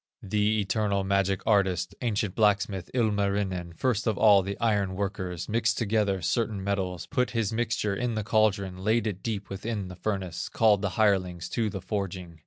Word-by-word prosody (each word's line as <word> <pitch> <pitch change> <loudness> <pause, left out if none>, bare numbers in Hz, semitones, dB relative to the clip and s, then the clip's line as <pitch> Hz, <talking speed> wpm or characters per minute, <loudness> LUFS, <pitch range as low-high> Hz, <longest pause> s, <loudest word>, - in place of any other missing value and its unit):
The 105 +2 +1
eternal 100 -1 0
magic 100 0 0
artist, 95 -3 +2
Ancient 105 -5 -1
blacksmith, 100 -3 +1
Ilmarinen, 100 -6 0
First 120 -3 0
of 110 -2 +1
all 105 -3 +6
the 100 +1 -5
iron 100 -5 +1
workers, 95 -3 -3
Mixed 115 +1 +1
together 105 -4 0
certain 105 +2 0
metals, 95 -3 -2
Put 125 -3 0
the 115 -3 0
mixture 110 -3 0
in 120 +2 -2
the 110 - -1
caldron, 100 -4 +1
Laid 110 +2 +2
it 100 -4 -3
deep 105 -3 -4
within 100 0 -4
the 90 - -8
furnace, 95 -4 -3
Called 105 -3 +3
the 100 -4 -3
hirelings 90 -5 +1
to 115 -2 0
the 95 -1 -5
forging. 95 -4 -4
100 Hz, 170 wpm, -27 LUFS, 95-110 Hz, -, all